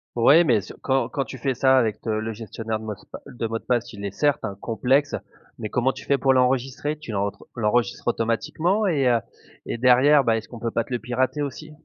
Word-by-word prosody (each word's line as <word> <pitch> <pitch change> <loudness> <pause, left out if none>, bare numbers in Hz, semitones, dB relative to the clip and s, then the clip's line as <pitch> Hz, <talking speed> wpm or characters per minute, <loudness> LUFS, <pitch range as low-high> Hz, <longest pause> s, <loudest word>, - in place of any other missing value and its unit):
Ouais, 145 +8 +6
mais 115 -7 +3
ce - - -11
quand 130 -3 0
quand 135 +2 -2
tu 130 - -8
fais 130 +2 -1
ça 130 +1 +4
avec 115 -4 +1
t 115 - -5
le 110 +1 -1
gestionnaire 110 0 -5
de 110 - -10
mocepa 105 -3 -8
de 115 - -5
mots 115 0 -3
de - - -25
passe, 120 -1 0
il 100 - -9
est, 100 - -3
certes, 145 +5 +1
hein, 100 -1 -4
complexe, 130 +5 +1 0.4
mais 105 - -4
comment 125 +2 +1
tu - - -10
fais 140 - +2
pour 135 0 +3
l'enregistrer? 130 +3 +1
Tu 135 -7 -8
l'enre 100 0 -2 0.2
l'enregistres 120 +2 0
automatiquement 155 - 0
et 140 -7 +2
heu 120 -2 +4 0.5
et - - -3
derrière, 130 +4 +5
bah, 115 -1 +2
est-ce 110 - -6
qu'on 120 - -9
peut 115 0 -2
pas 115 - 0
te 125 - -7
le 120 - 0
pirater 130 +5 -1
aussi? 155 +2 -7
125 Hz, 235 wpm, -24 LUFS, 115-135 Hz, 0.5 s, Ouais